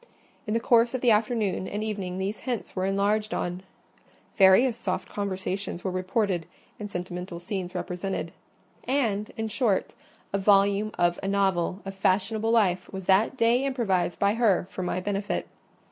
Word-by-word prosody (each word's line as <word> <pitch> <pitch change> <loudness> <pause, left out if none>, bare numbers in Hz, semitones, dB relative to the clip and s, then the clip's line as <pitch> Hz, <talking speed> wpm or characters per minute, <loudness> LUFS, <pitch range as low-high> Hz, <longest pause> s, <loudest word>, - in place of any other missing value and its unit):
In 215 - 0
the - - +3
course 235 0 +3
of 255 - -2
the 245 - +4
afternoon 215 -3 +1
and 210 +1 -3
evening 195 -4 -3
these 195 +3 -3
hints 245 -4 -4
were 185 0 0
enlarged 205 +2 +1
on: 180 +1 -3 0.7
various 200 +6 +6
soft 195 -6 -3
conversations 190 -2 -3
were 190 - -1
reported, 185 -1 -1 0.3
and 210 -1 -5
sentimental 180 -1 -5
scenes 185 0 -5
represented; 180 -1 -3 0.5
and, 225 -7 0
in 220 0 -2
short, 215 -2 0 0.4
a 200 - +1
volume 200 +1 +4
of 175 0 +2
a 195 - -3
novel 195 -2 0
of 195 - -5
fashionable 200 +3 +1
life 205 -6 +2
was 190 -1 -6
that 200 +8 +3
day 235 +2 +3
improvised 220 -10 0
by 200 0 +2
her 220 -6 +2
for - - -5
my 180 0 -1
benefit. 200 +1 -2
200 Hz, 160 wpm, -27 LUFS, 185-220 Hz, 0.7 s, various